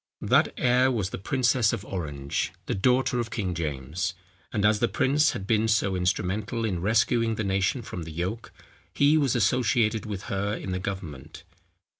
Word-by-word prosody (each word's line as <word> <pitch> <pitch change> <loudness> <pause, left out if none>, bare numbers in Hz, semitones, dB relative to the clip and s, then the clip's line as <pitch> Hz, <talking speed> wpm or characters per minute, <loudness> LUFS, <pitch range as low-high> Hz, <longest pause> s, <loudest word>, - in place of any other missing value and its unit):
That - - +3
heir 125 +1 +3
was 105 -6 -2
the - - -5
princess 125 0 +2
of 100 - -4
Orange, 75 -6 -3
the - - -2
daughter 125 +4 +2
of 115 -1 -2
King 100 -6 -2
James; 80 +2 -3 0.4
and 105 -1 0
as 105 0 +4
the 120 - +2
prince 145 +5 +2
had 95 - -5
been 110 +1 +2
so 105 -3 +2
instrumental 100 +5 -1
in 90 -6 -2
rescuing 115 +2 +2
the 110 - -2
nation 100 +5 0
from 90 - -6
the 80 0 -7
yoke, 95 +8 -4 0.4
he 145 +2 +4
was 140 -6 +2
associated 110 -1 +2
with 100 -2 -5
her 100 +2 -2
in 95 - -5
the 95 - -2
government. 85 -7 -7
105 Hz, 175 wpm, -26 LUFS, 90-120 Hz, 0.4 s, as